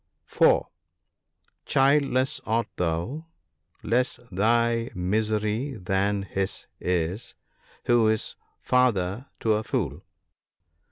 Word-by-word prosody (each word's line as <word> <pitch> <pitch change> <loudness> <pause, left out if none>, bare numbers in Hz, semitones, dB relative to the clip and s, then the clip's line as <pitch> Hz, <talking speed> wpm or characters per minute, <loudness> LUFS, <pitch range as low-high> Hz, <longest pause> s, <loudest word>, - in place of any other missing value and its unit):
(4 - - +3 0.5
) - - -44
Childless 135 -1 +2
art 115 +1 +1
thou? 90 - -2 0.6
Less 125 +3 0
thy 115 +4 +2
misery 110 +7 -1
than 100 +1 0
his 95 0 -3
is, 90 +4 -2 0.5
who 120 -2 +4
is 110 0 -1 0.3
father 120 -3 +1
to 110 - +3
a 105 - +1
fool. - - -2
110 Hz, 95 wpm, -26 LUFS, 95-125 Hz, 0.6 s, who